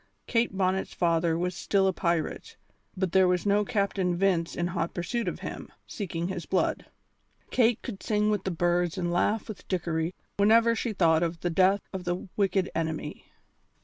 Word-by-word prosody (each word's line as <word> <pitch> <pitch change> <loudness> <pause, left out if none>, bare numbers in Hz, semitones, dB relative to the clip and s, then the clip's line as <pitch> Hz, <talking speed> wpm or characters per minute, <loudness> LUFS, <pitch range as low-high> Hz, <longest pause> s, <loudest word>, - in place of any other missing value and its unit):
Kate 230 -4 0
Bonnet's 190 0 0
father 165 -1 +2
was 180 +1 -1
still 195 +2 +1
a 190 - +2
pirate, 170 -3 -2 0.4
but 185 -2 0
there 190 0 +5
was 180 +1 +1
no 205 +1 +3
Captain 200 -5 0
Vince 175 -3 +1
in 175 - -1
hot 170 -1 -2
pursuit 230 +7 -2
of - - -3
him, - - -7
seeking 170 -4 -4
his 175 -4 -5
blood. 190 - 0 0.6
Kate 235 -2 +3
could 205 -7 -6
sing 210 0 +1
with 205 -3 -1
the - - -1
birds 175 +1 0
and 175 -1 -1
laugh 210 +5 +1
with 215 -4 -9
Dickory 170 -2 -1 0.2
whenever 225 +3 +5
she 230 +1 -2
thought 165 -5 +3
of 170 -1 -2
the 175 - -1
death 190 +3 +3
of 185 -1 -5
the 175 +2 -2
wicked 195 -2 +1
enemy. 160 -2 -3
185 Hz, 180 wpm, -28 LUFS, 170-200 Hz, 0.6 s, there